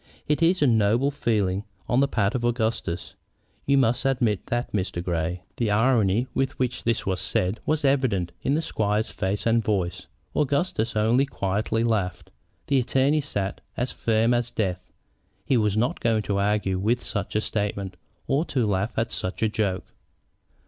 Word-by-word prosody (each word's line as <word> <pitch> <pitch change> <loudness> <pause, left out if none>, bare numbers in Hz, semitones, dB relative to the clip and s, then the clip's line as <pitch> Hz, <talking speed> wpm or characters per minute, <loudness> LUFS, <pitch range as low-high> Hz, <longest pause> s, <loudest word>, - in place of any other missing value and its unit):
It 150 +2 +1
is 170 0 +3
a - - +6
noble 115 +3 +3
feeling 105 -8 0 0.2
on 125 - +2
the 140 - +4
part 105 -6 +1
of 125 - -2
Augustus; 115 -7 -1 0.5
you 140 0 +4
must 125 -1 +2
admit 120 -7 +1
that, 120 +1 -2
Mr. 95 -3 -2
Grey." 85 0 -2
The 115 -3 0
irony 110 0 +3
with 135 0 -1
which 125 -1 -1
this 115 -1 0
was 95 -1 -1
said 95 +3 0
was 155 -1 +1
evident 125 -11 +1
in 140 - +1
the 160 - 0
squire's 105 -4 0
face 100 +1 -2
and 115 0 +3
voice. 90 -4 -1 0.3
Augustus 140 -6 0
only 115 +6 +3
quietly 110 +1 -1
laughed. 90 -7 -1 0.3
The 140 -1 +3
attorney 135 +4 +2
sat 100 -9 -3 0.2
as 125 +2 -1
firm 115 +1 +2
as 120 -1 0
death. 90 -5 -2 0.6
He 135 - +2
was 105 -3 +2
not 120 +4 +1
going 110 -2 +1
to 100 -1 -1
argue 100 -2 +1
with 115 +5 +1
such 105 -1 -3
a 110 - +3
statement 100 -3 -2 0.3
or 140 +4 +1
to 130 -8 0
laugh 100 +1 -1
at 115 +1 0
such 95 +4 -3
a 110 - +3
joke. 100 -4 -1
110 Hz, 170 wpm, -25 LUFS, 100-125 Hz, 0.6 s, a